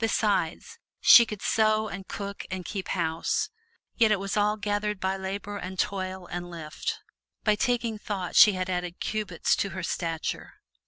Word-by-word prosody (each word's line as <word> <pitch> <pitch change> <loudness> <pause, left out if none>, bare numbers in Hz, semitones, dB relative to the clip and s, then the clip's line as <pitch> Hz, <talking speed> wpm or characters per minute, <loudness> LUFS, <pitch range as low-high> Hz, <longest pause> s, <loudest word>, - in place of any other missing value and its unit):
Besides, 220 - 0 0.2
she 235 -2 +8
could 210 -2 -7
sew 215 0 +2
and 195 -2 -7
cook 200 -1 -5
and 185 -1 -5
"keep 195 -3 -4
house." 165 -2 -1 0.4
Yet 225 -3 +4
it 210 - +3
was 195 0 -3
all 210 0 +2
gathered 205 0 -1
by 190 0 0
labor 200 +2 -5
and 185 -1 -6
toil 190 -2 -2
and 175 0 -6
lift. 155 -4 -4 0.5
By 215 - +4
taking 235 -1 0
thought 195 -4 -4
she 210 - +9
had 185 -1 -2
added 180 -1 -3
cubits 210 -6 0
to 200 - 0
her 185 - -4
stature. 165 -1 -3
195 Hz, 165 wpm, -27 LUFS, 180-210 Hz, 0.5 s, she